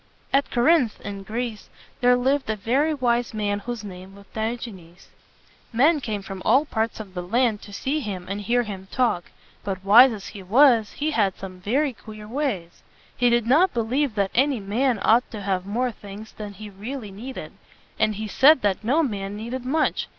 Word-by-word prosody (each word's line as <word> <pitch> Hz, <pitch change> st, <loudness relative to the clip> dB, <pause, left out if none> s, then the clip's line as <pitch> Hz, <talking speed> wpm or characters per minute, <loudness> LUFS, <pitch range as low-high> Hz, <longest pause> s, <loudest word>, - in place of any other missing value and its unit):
At 275 Hz, +1 st, +3 dB
Cor 240 Hz, -, 0 dB
inth, 275 Hz, -6 st, +3 dB
in 200 Hz, -1 st, -6 dB
Greece, 225 Hz, +2 st, -5 dB, 0.3 s
there 245 Hz, 0 st, +5 dB
lived 265 Hz, +1 st, 0 dB
a 220 Hz, -, +1 dB
very 260 Hz, +9 st, +1 dB
wise 245 Hz, -5 st, 0 dB
man 205 Hz, -1 st, -1 dB
whose 235 Hz, +1 st, -6 dB
name 190 Hz, -1 st, -10 dB
was 200 Hz, 0 st, -15 dB
Di 220 Hz, +2 st, -1 dB
og´e 235 Hz, -2 st, -7 dB
nes. 175 Hz, -1 st, -16 dB, 0.6 s
Men 295 Hz, +7 st, +4 dB
came 215 Hz, -6 st, -4 dB
from 195 Hz, -1 st, -7 dB
all 275 Hz, +4 st, +4 dB
parts 225 Hz, -5 st, -2 dB
of 200 Hz, -4 st, -9 dB
the 180 Hz, -, -4 dB
land 225 Hz, +3 st, +1 dB
to 205 Hz, -, -12 dB
see 270 Hz, +9 st, -2 dB
him 195 Hz, -9 st, -5 dB
and 200 Hz, +1 st, -4 dB
hear 240 Hz, +4 st, +1 dB
him 195 Hz, -3 st, -7 dB
talk. 240 Hz, -9 st, +1 dB, 0.4 s
But 195 Hz, -1 st, -4 dB
wise 240 Hz, +6 st, +8 dB
as 210 Hz, -3 st, -7 dB
he 200 Hz, -, -9 dB
was, 230 Hz, +2 st, +4 dB
he 305 Hz, +2 st, -2 dB
had 205 Hz, -8 st, +1 dB
some 185 Hz, -1 st, -9 dB
very 265 Hz, +9 st, 0 dB
queer 215 Hz, -2 st, -11 dB
ways. 225 Hz, -, -3 dB, 0.3 s
He 245 Hz, -1 st, +3 dB
did 235 Hz, -1 st, +2 dB
not 305 Hz, +7 st, +4 dB
believe 240 Hz, +2 st, 0 dB
that 200 Hz, -2 st, 0 dB
any 270 Hz, 0 st, +2 dB
man 230 Hz, +5 st, 0 dB
ought 235 Hz, +3 st, +4 dB
to 215 Hz, -, -7 dB
have 190 Hz, -1 st, -2 dB
more 245 Hz, +4 st, 0 dB
things 205 Hz, 0 st, -11 dB
than 210 Hz, -1 st, -8 dB
he 210 Hz, +1 st, -10 dB
re 205 Hz, +7 st, -7 dB
al 270 Hz, -, -5 dB
ly 210 Hz, -3 st, -9 dB
needed; 240 Hz, +7 st, -8 dB, 0.5 s
and 215 Hz, -1 st, +2 dB
he 215 Hz, +1 st, -4 dB
said 270 Hz, +5 st, +5 dB
that 205 Hz, 0 st, 0 dB
no 280 Hz, +9 st, +2 dB
man 200 Hz, -6 st, -3 dB
needed 240 Hz, +3 st, -5 dB
much. 305 Hz, +4 st, 0 dB
220 Hz, 205 wpm, -24 LUFS, 200-255 Hz, 0.6 s, wise